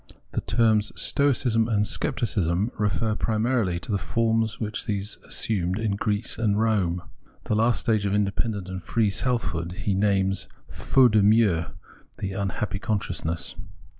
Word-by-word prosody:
The - - -2
terms 110 -2 +2
Stoicism 125 -5 +2
and 105 -3 +1
Scepticism 105 -4 0
refer 105 +1 0
primarily 110 -4 0
to 110 - -5
the 100 - +1
forms 115 +5 0
which 110 +1 -4
these 105 -1 -2
assumed 95 -4 -1
in 110 -1 -1
Greece 105 +2 -2
and 105 -2 +1
Rome. 95 -6 +1 0.4
The - - -2
last 115 +3 +2
stage 110 -3 +1
of 100 - -1
independent 100 -1 -1
and 95 0 -5
free 110 +3 +1
self 125 +3 0
hood 85 +1 -4
he 100 - +1
names, 95 -1 +1 0.2
faute 130 -3 +3
de 105 0 +4
mieux, 100 -5 +4 0.5
the 95 - -3
"unhappy 100 +1 -2
consciousness." 90 -6 -2
105 Hz, 145 wpm, -25 LUFS, 95-115 Hz, 0.5 s, de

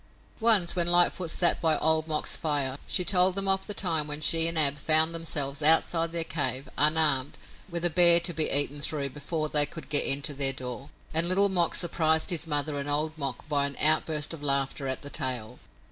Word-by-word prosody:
Once, 215 -7 +2
when 175 -1 0
Lightfoot 175 0 +2
sat 175 +2 +2
by 160 -2 +1
Old 160 0 0
Mok's 155 -1 -1
fire, 145 -3 -3
she 180 - -2
told 185 0 +3
them 195 0 0
of 190 0 -1
the 205 - -3
time 160 -6 -1
when 150 0 -5
she 165 +2 +3
and 165 0 -2
Ab 145 -2 +3
found 160 +2 +3
themselves 145 -4 -3
outside 165 +2 +5
their 170 -1 -2
cave, 140 -4 -3
unarmed, 150 -3 +2 0.3
with 170 0 -3
a - - +2
bear 170 0 +4
to 170 +1 -2
be 155 -1 -1
eaten 145 +1 +1
through 140 -2 -2
before 155 +3 -5
they 150 -1 +3
could 165 -2 -11
get 145 - +2
into 140 +2 -3
their 135 -1 +2
door, 125 +2 -9 0.2
and 165 +2 +1
Little 200 +2 +3
Mok 175 -3 -1
surprised 160 -1 0
his 170 -1 -2
mother 145 -1 -2
and 140 +1 -6
Old 155 +2 -2
Mok 140 -4 -6
by 145 -2 0
an 140 - -8
outburst 155 0 +1
of 160 - -11
laughter 140 -1 -2
at 130 +1 -5
the 145 - -8
tale. 125 -6 -4
155 Hz, 205 wpm, -25 LUFS, 145-170 Hz, 0.3 s, outside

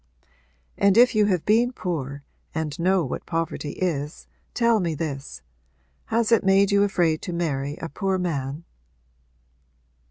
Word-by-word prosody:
'And 200 +1 +4
if 250 +1 +6
you 210 -2 +3
have 180 -5 0
been 235 +4 +3
poor 145 - -4 0.3
and 155 -2 -3
know 185 0 +2
what 130 - -5
poverty 165 -3 -3
is 150 -4 -3 0.3
tell 235 -2 +3
me 170 -4 -1
this: 140 - -5 0.6
has 230 0 0
it 230 - +4
made 195 +1 +4
you 200 0 +4
afraid 175 -6 +1
to - - -5
marry 145 -4 -2
a 165 - -5
poor 190 +2 -1
man?' 150 -4 -3
175 Hz, 140 wpm, -24 LUFS, 150-200 Hz, 0.6 s, if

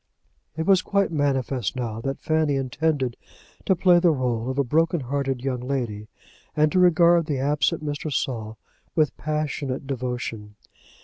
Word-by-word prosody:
It 160 - -1
was 190 -1 +5
quite 200 -1 0
manifest 135 - -1
now 115 -3 -4
that 135 +3 -3
Fanny 155 -2 +1
intended 135 -1 -1 0.5
to 190 - +4
play 180 0 +5
the 175 0 +4
role 125 -5 -1
of 130 - -3
a 140 - +3
broken 160 +4 +1
hearted 135 0 -2
young 130 -2 -1
lady, 120 -5 -3 0.5
and 155 0 +3
to 185 - +2
regard 170 -2 +5
the 145 -4 -1
absent 150 +4 0
Mr. 145 +1 -3
Saul 110 -5 -3 0.4
with 155 -3 +2
passionate 145 -3 -3
devotion. 120 -5 -4
140 Hz, 150 wpm, -24 LUFS, 125-155 Hz, 0.5 s, was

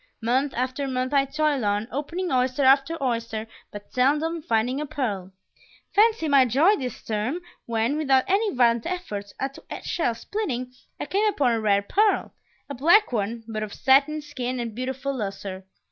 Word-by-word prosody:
Month 260 +4 +1
after 255 +3 -2
month 255 +1 -2
I 275 -1 +4
toil 295 -2 0
on, 205 +1 0
opening 335 +6 -3
oyster 255 +1 +1
after 275 +5 +4
oyster, 230 -3 -2 0.2
but 205 0 -11
seldom 300 +6 +1
finding 245 +2 0
a 300 - -4
pearl. 200 -10 -3 0.6
Fancy 430 -4 +3
my 280 -2 +6
joy 285 - +4
this 255 -7 -6
term 220 +9 -2 0.3
when, 230 +5 0
without 270 -4 +3
any 405 +2 +2
violent 235 0 +3
effort 210 - -5
at 270 +1 -4 0.2
shell 245 -9 -1
splitting, 255 - -4 0.3
I - - -3
came 415 +3 +1
upon 285 - +2
a 225 -1 0
rare 200 -2 +2
pearl; 415 - +1 0.3
a 280 - -6
black 340 - +4
one, 225 +1 -2
but 215 -1 -4
of 215 -1 -5
satin 285 +3 +3
skin 255 -4 -4
and 230 -2 -4
beautiful 265 +3 -3
lustre! 195 -4 -5
260 Hz, 165 wpm, -25 LUFS, 230-300 Hz, 0.6 s, my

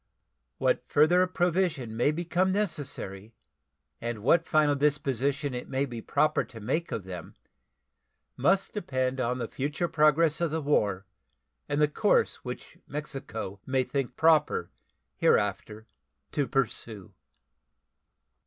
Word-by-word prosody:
What - - +1
further 175 +5 +4
provision 175 -10 0
may 120 +5 +3
become 175 +3 0
necessary 140 - -3 0.7
and 115 -3 -4
what 165 +6 +4
final 155 -2 +3
disposition 140 -1 0
it 125 - -5
may 135 +1 0
be 120 -4 -7
proper 150 +6 +2
to 115 - -12
make 135 +10 -2
of 105 - -3
them 90 -3 -8 1.0
must 195 +1 +2
depend 130 -9 -1
on 125 +1 0
the 120 -2 -3
future 145 +8 -2
progress 155 +1 +3
of 170 - +2
the 160 +2 -1
war 105 -10 +1 0.6
and 145 - 0
the 150 - +5
course 205 +8 +2
which 125 -1 -8
Mexico 135 -9 -6
may 130 0 +2
think 135 0 -3
proper 155 - +3 0.5
hereafter 105 +1 +1 0.5
to 140 -2 0
pursue. 115 -6 -2
140 Hz, 125 wpm, -28 LUFS, 120-160 Hz, 1.0 s, the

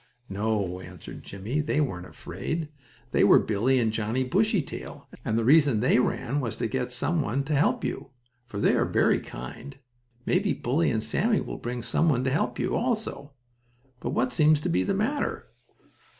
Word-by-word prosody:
"No," 100 -3 -1
answered 90 -2 -10
Jimmie, 105 +9 -4
"they 150 0 0
weren't 90 -12 -2
afraid. 160 -1 -5 0.4
They - - +3
were - - +7
Billie 115 +5 +2
and 110 -2 +1
Johnnie 110 +4 0
Bushytail, 190 - -1 0.2
and 110 - 0
the 115 - +1
reason 140 -4 +5
they 125 +2 +3
ran 125 +2 0
was 120 -6 -3
to - - -3
get 125 +1 -2
some 160 +7 0
one 135 +2 -1
to 150 +3 -2
help 145 +2 +2
you, - - -4 0.4
for 100 -5 -6
they - - +3
are - - +3
very - - +3
kind. 115 - -9 0.5
Maybe 195 +2 +2
Bully 140 +8 +1
and 110 -1 0
Sammie 215 - +1
will - - -6
bring 120 0 -4
some 165 - +2
one 130 -4 +2
to 130 - 0
help 150 - 0
you, - - -1
also. 220 - -2 0.7
But - - -4
what 125 0 0
seems 155 +3 +4
to - - -2
be 90 +2 +2
the 95 - 0
matter?" 255 +9 -1
130 Hz, 180 wpm, -27 LUFS, 110-155 Hz, 0.7 s, were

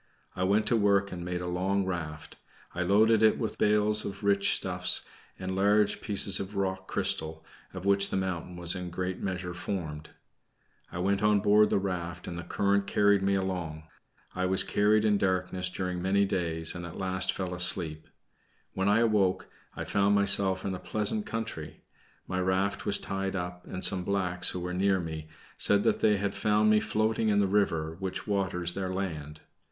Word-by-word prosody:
I 90 - -2
went 105 +3 +2
to 120 - +2
work 100 -2 +2
and 85 -1 -6
made 90 0 -4
a 90 - -4
long 95 +2 0
raft. 80 -4 -6 0.4
I 90 - -3
loaded 105 +4 +4
it 110 -1 +4
with 110 - -4
bales 105 0 +4
of 100 +2 -7
rich 100 -1 +2
stuffs, - - +1 0.3
and 95 0 -4
large 105 +1 +2
pieces 100 -2 +2
of 100 +1 -6
rock 95 -1 -2
crystal, 80 0 -2 0.3
of 95 0 -8
which 100 0 +3
the - - -2
mountain 90 -2 -3
was 85 0 +1
in 90 -2 -5
a - - -6
great 90 +1 -4
measure 90 -2 -4
formed. 80 -4 -5 0.8
I - - -7
went 100 +2 0
on 105 -1 +3
board 105 +1 +4
the - - +2
raft, 90 -3 -4
and 85 - -5
the 85 - -5
current 100 +2 0
carried 100 -1 +3
me 100 0 +1
along. 90 -5 -3 0.5
I 95 0 -1
was 95 +1 +2
carried 105 +1 +2
in 105 -2 +2
darkness 90 -1 -1
during 90 -1 -4
many 100 +2 +2
days, 85 -4 -1
and 85 - -7
at 85 0 -8
last 95 -1 +2
fell 90 -2 -4
asleep. 90 -3 0 0.7
When 95 +1 0
I 110 +3 +4
awoke, 105 -5 +1 0.3
I - - -4
found 100 0 +2
myself 100 -2 +2
in 95 - -2
a 90 - -5
pleasant 105 0 -1
country. 110 -9 -6 0.4
My 90 - -2
raft 95 +2 -1
was - - +6
tied 95 0 -3
up 90 -1 -5
and 95 - -2
some 95 -2 0
blacks, 90 -2 0
who 90 - -4
were 90 0 -4
near 95 +1 +2
me, 80 -2 -6 0.3
said 100 0 +3
that - - +1
they 105 -1 +3
had 100 0 -2
found 105 0 +2
me 105 - +5
floating 110 +1 0
in 105 - +2
the 100 - +3
river 85 -5 0
which 95 -2 -4
waters 95 -4 0
their 95 -1 -3
land. 80 -6 -5
95 Hz, 190 wpm, -28 LUFS, 90-100 Hz, 0.8 s, was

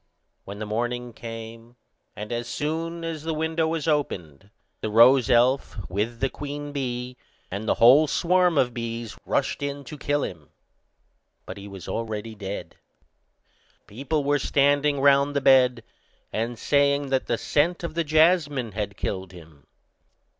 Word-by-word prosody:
When 100 +1 -8
the 110 - -5
morning 120 +3 -3
came, 115 +1 -9 0.4
and 105 +2 -7
as 120 0 -3
soon 165 +5 -3
as 165 -2 -4
the 160 0 -3
window 160 +1 0
was 160 -1 -2
opened, 100 - -2 0.3
the 110 - -3
rose 120 +4 +6
elf, 125 +2 +3
with 110 +5 -2
the 135 - +1
queen 145 0 -6
bee, 125 -2 -4 0.3
and 100 +4 -4
the - - +3
whole 135 +7 +6
swarm 180 +2 +2
of 125 -3 +2
bees, 115 -1 -5
rushed 140 - 0
in 140 0 -4
to 145 +2 -10
kill 145 0 0
him. 80 -5 -7 1.0
But 95 - -8
he 100 0 -9
was 95 -3 -10
already 110 -1 -4
dead. 100 -1 -7 1.1
People 140 +7 -2
were 145 +1 +2
standing 145 +1 +2
round 140 +1 +4
the - - +3
bed, 130 -2 +4 0.5
and 115 +2 -2
saying 140 +2 +2
that 130 -1 0
the 120 - 0
scent 170 +8 0
of 170 - -4
the 170 +1 0
jasmine 155 -6 +2
had 100 0 -4
killed 95 -2 -4
him. 80 -4 -15
130 Hz, 155 wpm, -25 LUFS, 115-145 Hz, 1.1 s, rose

